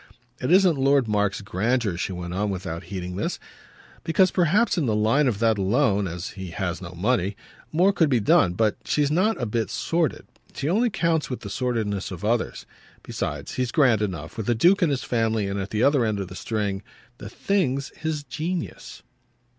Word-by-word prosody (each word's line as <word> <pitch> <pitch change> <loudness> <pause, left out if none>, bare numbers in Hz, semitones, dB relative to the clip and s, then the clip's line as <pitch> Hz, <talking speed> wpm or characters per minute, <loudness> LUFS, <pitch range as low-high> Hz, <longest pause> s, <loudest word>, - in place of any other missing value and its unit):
"It 125 - -2
isn't 180 -5 +5
Lord 135 -2 +3
Mark's 105 -2 0
grandeur," 105 +1 0
she 95 - -3
went 90 -1 -5
on 100 +3 -1
without 90 -3 -5
heeding 90 0 -5
this; - - -2 0.7
"because 180 +3 +3
perhaps 190 +6 +2
in 160 -8 0
the 110 - +1
line 115 +7 +3
of 115 -5 0
that 110 -1 +2
alone 100 0 +2
as 85 +1 -5
he 95 -2 -8
has 90 0 -3
no 90 -1 -8
money 100 +1 0 0.4
more 180 +5 +3
could 165 -6 +3
be 125 -4 +3
done. 100 -3 +4
But 105 +3 +1
she's 145 -1 +1
not 200 +8 +2
a 120 - -1
bit 110 0 -1
sordid; 165 -2 -1 0.3
she 140 - -3
only 225 +9 +2
counts 170 -6 0
with 125 - -4
the 100 - -7
sordidness 110 -6 -2
of 95 0 -6
others. 115 +2 -1 0.4
Besides, - - -4
he's 125 -2 -1
grand 125 -7 +4
enough, 90 -8 -4
with 110 0 -3
a 120 - +3
duke 180 - +4
in 170 - +3
his 135 -3 -1
family 115 -3 0
and 100 0 -2
at 95 0 -4
the 110 +3 0
other 140 -2 +4
end 110 -2 0
of 95 -2 -4
the 90 - -9
string. 100 -2 -2 0.4
THE - - -8
thing's 140 -9 0
his 155 -2 -3
genius." 160 +6 -5
115 Hz, 195 wpm, -24 LUFS, 100-150 Hz, 0.7 s, isn't